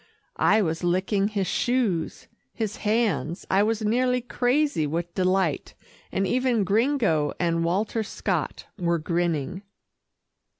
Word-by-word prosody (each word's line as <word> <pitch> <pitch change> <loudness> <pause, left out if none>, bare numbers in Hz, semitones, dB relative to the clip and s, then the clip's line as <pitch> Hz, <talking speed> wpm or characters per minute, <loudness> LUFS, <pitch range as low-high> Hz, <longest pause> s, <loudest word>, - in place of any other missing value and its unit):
I 215 - +4
was 165 0 -2
licking 190 +3 +1
his 205 -2 -1
shoes, 225 -8 -1 0.3
his 220 -2 -3
hands 210 -6 0
I 195 - +4
was 220 +1 0
nearly 250 +3 +2
crazy 245 - +1
with 170 +3 -3
delight, 185 -4 0 0.4
and 195 - 0
even 245 0 +1
Gringo 205 - +1
and 165 -1 +1
Walter 205 +6 0
Scott 215 - -3
were 170 -1 +1
grinning. 170 +1 -1
195 Hz, 120 wpm, -25 LUFS, 170-225 Hz, 0.4 s, I